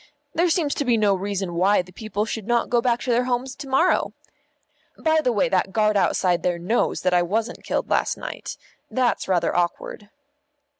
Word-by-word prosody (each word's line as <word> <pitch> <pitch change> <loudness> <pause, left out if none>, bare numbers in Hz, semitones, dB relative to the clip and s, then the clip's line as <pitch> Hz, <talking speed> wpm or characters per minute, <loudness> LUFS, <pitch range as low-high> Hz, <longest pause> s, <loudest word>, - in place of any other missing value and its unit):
There 345 +2 +2
seems 320 -4 +1
to - - -2
be 245 -4 +2
no 210 -2 +3
reason 195 -1 -3
why 185 +3 +3
the 180 - -16
people 215 +1 -3
should 220 -2 -5
not 240 -1 +1
go 240 -1 +3
back 240 0 +1
to 250 - -1
their 245 +1 +2
homes 255 +2 -2
to 275 - -8
morrow. 300 +8 +2 0.8
By 315 0 +2
the 255 - +1
way, 205 -4 +2
that 190 0 +1
guard 215 -1 +2
outside 185 -2 +2
there 175 -1 0
knows 185 +8 0
that 180 0 +1
I 175 - +4
wasn't 220 +7 -2
killed - - -2
last - - 0
night; - - -7 0.3
that's 255 -2 0
rather 175 -3 +1
awkward." 175 +3 -2
215 Hz, 195 wpm, -23 LUFS, 185-250 Hz, 0.8 s, I